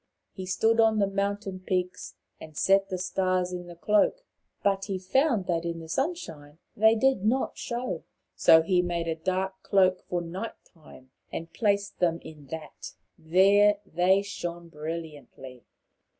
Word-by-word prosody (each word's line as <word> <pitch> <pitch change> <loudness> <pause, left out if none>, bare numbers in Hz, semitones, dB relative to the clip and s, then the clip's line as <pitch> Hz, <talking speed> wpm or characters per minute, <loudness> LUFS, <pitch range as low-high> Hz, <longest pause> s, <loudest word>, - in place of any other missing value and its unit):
He 185 -1 -7
stood 225 +5 +2
on 220 -1 +4
the 205 - +3
mountain 200 -1 -2
peaks 185 -1 -3 0.2
and 155 -2 -12
set 195 0 +3
the 185 - -2
stars 185 0 0
in 175 -1 -6
the 175 - -10
cloak. 210 - +2 0.4
But 195 -1 +1
he 195 -2 -3
found 220 +3 +1
that 170 -2 -1
in 170 -1 -3
the 165 - -9
sunshine 165 - -4 0.2
they 220 +2 +5
did 265 -3 +2
not 245 +5 +1
show. 245 +1 -4 0.3
So 160 0 +6
he 180 +1 +2
made 170 -1 -2
a 165 - 0
dark 190 +3 -3
cloak 185 -2 +3
for 175 -1 -1
night 185 +7 -6 0.2
time, 140 -6 -17 0.2
and 165 0 -6
placed 200 -2 0
them 170 -2 +2
in 150 -3 -12
that. 155 +2 -8 0.2
There 195 +5 +4
they 185 +3 +2
shone 175 -4 -6
brilliantly. 150 -5 -8
185 Hz, 155 wpm, -27 LUFS, 165-200 Hz, 0.4 s, So